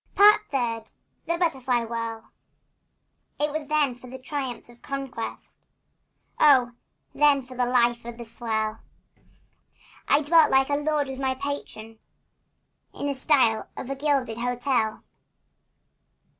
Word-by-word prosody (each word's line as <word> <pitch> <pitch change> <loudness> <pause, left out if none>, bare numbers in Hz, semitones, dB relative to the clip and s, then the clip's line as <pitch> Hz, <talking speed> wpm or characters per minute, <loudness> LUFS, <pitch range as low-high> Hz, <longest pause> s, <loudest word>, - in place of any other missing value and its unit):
Part 410 +2 +7
Third. 230 -4 -2 0.3
THE 335 - 0
BUTTERFLY 260 -8 0
WHIRL. 230 -1 -5 1.1
It 295 0 0
was 305 -1 -4
then 300 -3 +2
for 245 +1 -14
the 260 - -8
triumphs 265 -1 -5
of 240 0 -15
conquest! 270 -4 -6 0.7
Oh, 260 -5 +5 0.4
then 290 -2 +4
for 255 +1 -12
the 250 0 0
life 240 -1 +2
of 235 0 -8
the 235 - -7
swell! 220 -1 -3 1.3
I 285 - +4
dwelt 320 +1 +5
like 265 +1 +3
a - - +3
lord 295 -1 0
with 265 0 -6
my 265 -1 0
patron 260 -5 -6 1.0
In 285 - -3
a - - 0
suite 260 -5 +3 0.2
of 265 - -5
a - - -2
gilded 270 -5 0
hotel. 245 -2 -1
260 Hz, 130 wpm, -25 LUFS, 235-285 Hz, 1.3 s, Part